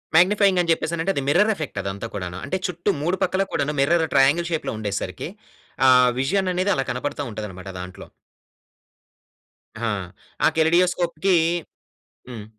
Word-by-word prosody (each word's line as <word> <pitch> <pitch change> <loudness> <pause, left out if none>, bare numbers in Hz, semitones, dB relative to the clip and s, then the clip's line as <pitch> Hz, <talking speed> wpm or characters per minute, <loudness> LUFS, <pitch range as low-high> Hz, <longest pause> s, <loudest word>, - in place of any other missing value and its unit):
Magnifying 190 +1 +4
అని 170 -1 +1
చెప్పేసనంటే 170 +3 0
అది 140 - 0
మిర్రర్ 205 +9 +4
ఎఫెక్ట్ 150 - -5
అదంతా 100 +3 -5
కూడాను. 90 -3 -5
అంటే 190 - -2
చుట్టూ 175 +3 -3
3 175 +4 0
పక్కల 190 +1 +1
కూడాను 150 +1 -1
మిర్రర్ 160 +3 +3
ట్రయాంగిల్ 150 +6 +4
షేప్‌లో 160 - -2
ఉండేసరికి, 100 -2 -4 0.6
ఆ - - +8 0.3
విజన్ 185 +8 +1
అనేది 185 +3 +1
అలా 135 - -1
కనపడతా 145 +3 -3
ఉంటదన్నమాట 95 -3 -7
దాంట్లో. 90 +1 -9 1.7
హా! 115 -1 -1 0.5
ఆ - - +7
కెలిడియోస్కోప్‌కీ 175 +2 +2 0.9
హ్మ్. 115 -4 -8
160 Hz, 135 wpm, -23 LUFS, 120-180 Hz, 1.7 s, ఆ